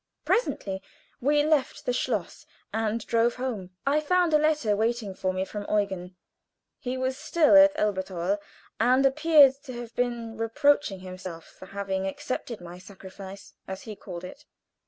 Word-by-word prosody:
Presently 195 - 0 0.4
we 290 +3 +3
left 305 -3 +1
the 250 - +1
schloss 225 -7 -2 0.3
and 220 0 -1
drove 235 +1 +2
home. 240 -8 -4 0.2
I 285 +2 +3
found 350 +1 +2
a 305 - +6
letter 300 -9 +2
waiting 220 -1 -1
for 185 0 -1
me 185 0 -2
from 205 +1 -6
Eugen. 190 -3 -1 0.6
He 255 +1 -3
was 260 0 -1
still 305 0 +4
at 290 0 +8
Elberthal, 190 - -1 0.4
and 255 +4 +4
appeared 295 0 +6
to 255 - -7
have 240 -1 -8
been 235 -2 -2
reproaching 225 -2 +2
himself 185 -3 -8
for 185 - -14
having 195 -1 -2
accepted 235 +3 -4
my 175 +1 -9
"sacrifice," 195 +1 -11
as 190 0 -6
he 215 -2 -7
called 180 -3 -8
it. 180 - -10
225 Hz, 155 wpm, -27 LUFS, 190-265 Hz, 0.6 s, at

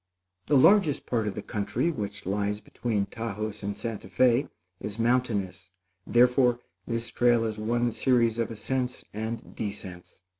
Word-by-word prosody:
The 145 - +5
largest 160 -1 +5
part 115 -3 0
of 100 - -3
the 105 - -5
country 105 +10 -1
which 100 -7 -5
lies 100 +2 -1
between 110 -2 -2
Taos 110 -1 -5
and 100 0 -4
Santa 115 -3 -5
Fé, 120 +8 +3 0.3
is 105 0 -6
mountainous; 110 -7 0 0.4
therefore, 125 0 +4 0.3
this 115 0 -2
trail 120 0 +3
is 110 -1 -3
one 120 +2 +1
series 115 -1 +2
of 115 - 0
ascents 125 +3 -3
and 110 +2 -5
descents. 95 -4 -7
115 Hz, 145 wpm, -27 LUFS, 105-120 Hz, 0.4 s, The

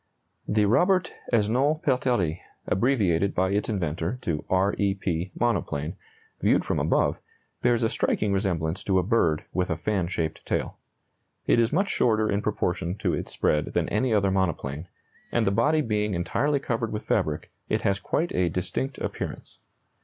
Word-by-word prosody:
The 105 0 +2
Robert 180 - +3 0.2
Esnault 125 +8 +2
Pelterie 120 - +1 0.3
(abbreviated 100 -5 +1
by 95 +1 +2
its 105 +3 0
inventor 85 +1 -2
to 80 -8 -2
R 95 +2 +2
E 100 -1 +2
P) 90 -2 -2
monoplane, 90 -8 -1 0.5
viewed - - +3
from - - 0
above, - - +1 0.4
bears 120 -1 +2
a 110 - +3
striking 105 -2 0
resemblance 90 -2 -1
to 95 -2 +2
a 90 - +3
bird 85 -7 +2
with 90 -1 0
a 80 - -1
fan 95 0 -1
shaped 80 -3 -3
tail. - - -2 0.7
It - - +4
is 115 0 +3
much 190 +6 +1
shorter 110 -2 +2
in 100 - +1
proportion 90 -3 -1
to - - 0
its - - -3
spread 75 0 0
than - - +1
any 115 +4 +1
other 100 -3 +3
monoplane, 85 -5 -1 0.4
and - - +2
the 95 - +2
body 155 +9 +3
being 105 -5 0
entirely 140 +11 0
covered 115 -4 -2
with 105 - -4
fabric, - - -1 0.2
it - - 0
has 100 -1 +1
quite 165 - -1
a 90 -1 +2
distinct 95 - -2
appearance. - - -6
100 Hz, 165 wpm, -26 LUFS, 90-115 Hz, 0.7 s, It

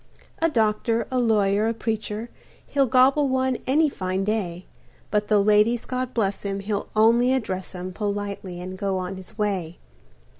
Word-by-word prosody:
A 330 - +4
doctor, 225 -2 +1
a 255 - +1
lawyer, 210 -3 +2
a 230 - -1
preacher, 220 0 -3 0.3
He'll 275 -2 +1
gobble 265 +3 +4
one 260 -1 +1
any 305 +4 +4
fine 190 -7 -2
day, 190 -4 -2 0.5
But 210 0 +1
the 210 - +4
ladies, 210 +3 +3
God 255 0 -3
bless 200 -4 0
'em, 200 -1 -2
he'll 200 0 -3
only 235 +3 +4
address 190 -8 -3
'em 180 +1 -6
Politely 200 -3 -4
and 185 +1 -7
go 195 -1 -1
on 185 +1 -4
his 190 +3 -11
way. 190 -6 -2
210 Hz, 160 wpm, -24 LUFS, 195-240 Hz, 0.5 s, A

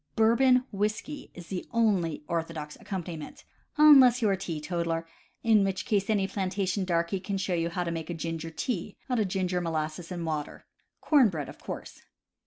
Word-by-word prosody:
Bourbon 250 +3 +4
whiskey 210 +8 -3
is 175 -2 -10
the 185 -2 -3
only 190 -10 +1
orthodox 165 -3 -3
accompaniment, 175 -5 -6 0.3
unless 270 -5 +8
you 220 -4 +2
are - - +3
a - - +2
teetotaler, 165 -1 -2 0.4
in 220 -3 +5
which 195 -1 -1
case 200 -2 0
any 200 -3 +2
planta 195 0 -2
tion 190 +1 0
darky 170 +1 0
can 195 +1 -3
show 190 -1 -1
you 170 -1 0
how 180 +1 -2
to 170 - -3
make 165 -1 -4
"ginger 165 0 -4
tea" 215 +4 -4
out 250 - +2
of 210 - +2
ginger, 185 -1 -1
molasses 160 +1 -3
and 175 -2 -4
water. 155 -2 -4 0.4
Corn 280 -7 +5
bread, 155 -6 -4
of - - -12
course. - - -8
185 Hz, 180 wpm, -28 LUFS, 165-210 Hz, 0.4 s, unless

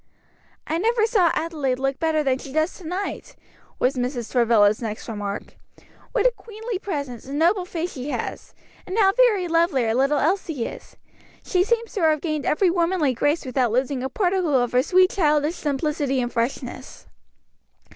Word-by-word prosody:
"I 325 - -1
never 445 +2 +2
saw 405 -7 +3
Adelaide 300 -6 -1
look 270 +1 -2
better 320 -2 +1
than 265 -2 +1
she 275 - -9
does 315 +4 0
to - - -13
night," 365 +5 -5 0.4
was 255 - +2
Mrs. 245 -2 -3
Travilla's 225 -4 +4
next 215 -2 -5
remark; 205 -3 -5 0.5
"what - - 0
a - - +6
queenly 445 -2 -6
presence, 285 - -5
and 275 +2 -5
noble 355 +4 +2
face 350 -1 -4
she 260 +2 -6
has, - - -5 0.3
and 375 +3 -4
how 390 -3 +5
very 440 -7 +3
lovely 330 -6 +2
our 225 - +1
little 275 +4 +2
Elsie 320 -7 0
is! - - -9 0.5
She 360 -1 +2
seems 465 +2 -1
to 410 - -2
have 310 -2 +3
gained 310 -2 -3
every 350 +3 +3
womanly 340 -5 +1
grace 290 +6 0
without 250 -2 0
losing 255 +2 0
a 265 - -3
particle 360 -2 +1
of 245 -1 0
her 250 - +4
sweet 370 +6 +4
childish 300 -3 +2
simplicity 290 -3 -1
and 240 -1 -2
freshness." 250 +2 -4
305 Hz, 175 wpm, -23 LUFS, 260-365 Hz, 0.5 s, a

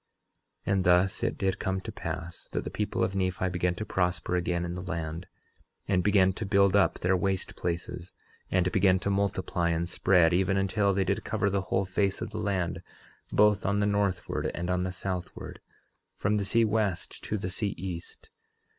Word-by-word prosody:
11:20 - - +1
And 95 -1 +2
thus 90 +2 +3
it - - 0
did 95 0 0
come 95 -2 -1
to - - -7
pass 85 +1 -6
that - - -1
the - - -5
people 105 -3 -1
of 95 +1 -1
Nephi 95 -1 0
began 90 0 0
to 110 - -4
prosper 90 -3 0
again 90 0 0
in 85 - -4
the 90 - -5
land, 85 -1 -4 0.6
and 95 -2 +2
began 95 -2 +4
to 110 - -5
build 100 -1 +4
up 100 - +3
their 95 +1 +2
waste 95 +1 -1
places, 85 +1 -4 0.4
and 90 -1 +2
began 95 0 +4
to 100 +2 -1
multiply 95 -3 0
and 85 +1 0
spread, 90 -1 +3
even 95 +2 +2
until 100 +1 +2
they 95 - +2
did 95 - -1
cover 100 - 0
the 100 0 +1
whole 95 +1 +1
face 95 +1 0
of 110 - -5
the 110 - -4
land, 95 -4 -1 0.5
both 105 -1 +4
on 100 +1 +1
the 105 - +2
northward 100 -3 0
and 85 +1 -2
on 90 0 +1
the 90 0 -1
southward, 90 -1 -5 0.6
from 105 +1 +1
the 100 - -1
sea 115 +3 +3
west 105 -4 -1
to 110 - -1
the 90 -2 -4
sea 100 +2 -2
east. 85 -1 -7
95 Hz, 195 wpm, -28 LUFS, 90-100 Hz, 0.6 s, began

